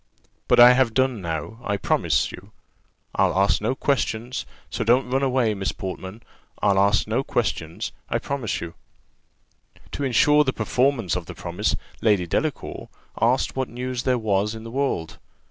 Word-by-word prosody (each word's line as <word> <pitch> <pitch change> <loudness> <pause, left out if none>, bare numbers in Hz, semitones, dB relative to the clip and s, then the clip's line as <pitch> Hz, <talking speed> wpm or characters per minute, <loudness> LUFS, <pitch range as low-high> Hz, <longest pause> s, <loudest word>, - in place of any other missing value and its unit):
But - - +4
I 120 +1 +10
have 125 -3 +2
done 130 -5 +1
now, 85 +6 -4
I 100 -3 -1
promise - - +1
you; - - -12 0.6
I'll - - +2
ask 95 -1 +3
no 115 +5 0
questions: 125 -3 -1 0.2
so - - -2
don't 125 +2 +2
run 135 +1 +2
away, 130 -5 +2
Miss 95 -1 -2
Portman; 95 +3 -7 0.4
I'll 100 -1 +3
ask 100 +2 +3
no 115 +5 0
questions, 85 -11 -2 0.2
I - - +1
promise 135 -6 -3
you." 85 -1 -6 1.2
To 145 - -4
ensure 150 +3 +4
the 130 -2 -1
performance 125 - +1
of - - -4
the - - -8
promise, 90 +5 -1 0.3
Lady 105 -5 +3
Delacour 145 - -3 0.3
asked 125 +3 +2
what 130 -1 -2
news 125 0 -4
there 130 -1 +1
was 105 -1 0
in 110 - -8
the 115 - -8
world? 130 - -2
115 Hz, 165 wpm, -24 LUFS, 100-130 Hz, 1.2 s, I